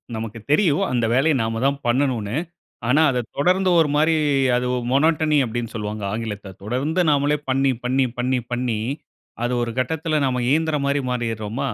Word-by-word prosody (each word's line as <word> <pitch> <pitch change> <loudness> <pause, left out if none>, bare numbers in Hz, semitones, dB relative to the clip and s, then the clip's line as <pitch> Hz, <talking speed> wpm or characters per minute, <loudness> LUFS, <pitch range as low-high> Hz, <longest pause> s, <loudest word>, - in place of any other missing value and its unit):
நமக்கு 110 +1 -5
தெரியும் 165 +2 +3
அந்த 120 -2 +1
வேலைய 140 +5 +3
நாம 115 +1 -2
தான் 140 0 +2
பண்ணணும்னு. 120 -4 0 0.5
ஆனா, 140 +6 +4
அத 125 -1 -1
தொடர்ந்து 185 +5 +2
ஒரு 155 - +3
மாரி 160 +2 +3 0.4
அது 125 0 0 0.2
மோனோட்டனி 155 +2 +3
அப்படினு 115 0 -4
சொல்லுவாங்க, 105 -1 -4
ஆங்கிலத்துல. 105 -3 -5
தொடர்ந்து 135 - -1
நாமலே 145 0 +2
பண்ணி, 135 +1 +2
பண்ணி, 130 +2 +2
பண்ணி, 125 +1 0
பண்ணி 120 -3 -1 0.6
அது 120 - 0
ஒரு 120 - -2
கட்டத்தில, 160 +3 -1
நாம 125 -1 0
இயந்திர 160 +1 +2
மாரி 140 0 +1
மாறிடுறோமா. 115 +2 -3
130 Hz, 155 wpm, -22 LUFS, 115-150 Hz, 0.6 s, ஆனா